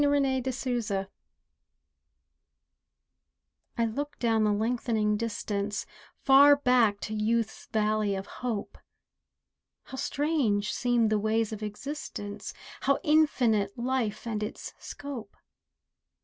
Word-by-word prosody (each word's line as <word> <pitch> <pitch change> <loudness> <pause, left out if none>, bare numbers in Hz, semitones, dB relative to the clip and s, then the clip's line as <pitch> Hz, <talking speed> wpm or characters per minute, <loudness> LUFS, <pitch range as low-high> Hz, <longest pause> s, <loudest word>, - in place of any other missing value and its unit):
RETROSPECTION 260 -7 0 2.7
I 230 - +2
look 285 +6 -4
down 225 -2 +2
the 210 - +3
lengthening 220 0 +1
distance 210 -2 -2 0.4
Far 280 +1 +8
back 250 -7 +3
to 215 - -4
youth's 220 +1 -1
valley 215 -2 +1
of 190 0 -4 0.2
hope. 235 -5 -3 1.0
How 265 - -9
strange 265 -10 0
seemed 240 -3 +2
the 215 - +3
ways 220 +1 0
of 215 - -6
existence, 210 -2 -6 0.3
How 275 +1 +2
infinite 245 -10 +3
life 240 -3 -1
and 220 -2 -2
its 210 - -5
scope! 260 -8 -8
225 Hz, 100 wpm, -28 LUFS, 210-260 Hz, 2.7 s, Far